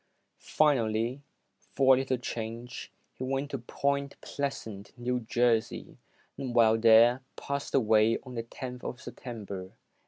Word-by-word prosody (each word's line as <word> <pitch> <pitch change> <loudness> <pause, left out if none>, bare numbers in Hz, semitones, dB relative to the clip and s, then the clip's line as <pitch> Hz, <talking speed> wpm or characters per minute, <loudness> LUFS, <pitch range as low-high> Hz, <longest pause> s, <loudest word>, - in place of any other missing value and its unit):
Finally, 120 -3 +1 0.4
for 135 -1 +3
a 130 - +4
little 130 -1 0
change, 120 0 -6 0.2
he - - -7
went 135 +2 -2
to 135 - -3
Point 140 +3 -2
Pleasant, 110 -7 -5
New 125 +1 -1
Jersey, 120 -1 0 0.4
and 125 -3 -4
while 115 -1 +5
there, 115 +3 +6
passed 140 0 -3
away 110 -2 +4
on 130 -2 -10
the 115 - -2
tenth 125 +2 -8
of 125 - -5
September, 110 -8 -7
1898. 95 0 -10
120 Hz, 135 wpm, -29 LUFS, 115-135 Hz, 0.4 s, there